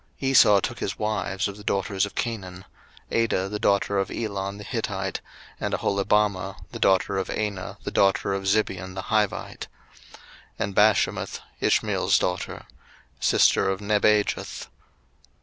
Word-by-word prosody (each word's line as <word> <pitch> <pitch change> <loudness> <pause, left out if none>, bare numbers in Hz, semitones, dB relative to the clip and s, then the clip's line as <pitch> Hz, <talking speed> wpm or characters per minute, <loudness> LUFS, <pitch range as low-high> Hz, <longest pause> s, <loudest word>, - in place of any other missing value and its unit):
01:036:002 135 - 0
Esau 105 -6 +7
took 120 +3 -4
his 100 - -3
wives 100 -1 -1
of 100 0 -7
the 105 - -11
daughters 100 0 0
of - - -14
Canaan; 95 -6 -4 0.5
Adah 110 -5 +1
the 105 +1 -4
daughter 100 -1 +2
of 95 - -1
Elon 100 -3 -4
the 105 - -8
Hittite, 95 - -3 0.4
and - - -1
Aholibamah 100 -1 +1 0.2
the - - -7
daughter 95 0 +2
of 95 - -4
Anah 105 -3 -3
the - - -4
daughter 100 0 +2
of 95 0 -3
Zibeon 95 -3 0
the 95 - -4
Hivite; 105 -2 -1 0.4
01:036:003 - - -16 0.4
And 100 - -2
Bashemath 105 -1 +2 0.2
Ishmael's - - +2
daughter, - - -3 0.5
sister - - +3
of 95 0 -1
Nebajoth. 105 0 +1
100 Hz, 145 wpm, -25 LUFS, 95-105 Hz, 0.5 s, Esau